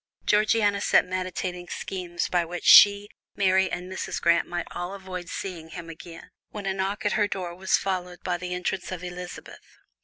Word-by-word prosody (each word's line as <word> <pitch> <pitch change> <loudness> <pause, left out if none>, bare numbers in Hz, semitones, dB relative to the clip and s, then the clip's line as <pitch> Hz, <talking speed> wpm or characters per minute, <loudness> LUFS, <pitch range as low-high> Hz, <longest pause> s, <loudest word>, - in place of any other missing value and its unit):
Georgiana 210 -1 +3
sat - - +4
meditating 180 -1 -4
schemes 180 -2 -4
by 175 -1 +1
which 175 +1 -6
she, 205 0 +8 0.3
Mary 190 -1 +3
and 180 - -4
Mrs. 190 0 -4
Grant 170 0 +3
might 175 -1 -3
all 175 +3 -5
avoid 185 -2 -7
seeing 170 -4 -6
him 165 0 -8
again, 165 +1 -12 0.2
when 205 -2 -7
a 195 - 0
knock 195 +2 -3
at 205 - +2
her 205 -1 +2
door 185 -3 -4
was 185 +2 +1
followed 180 -2 -3
by 180 -1 -1
the 180 +1 -6
entrance 180 +2 -3
of 180 -1 -5
Elizabeth. 180 0 -9
185 Hz, 180 wpm, -26 LUFS, 175-195 Hz, 0.3 s, she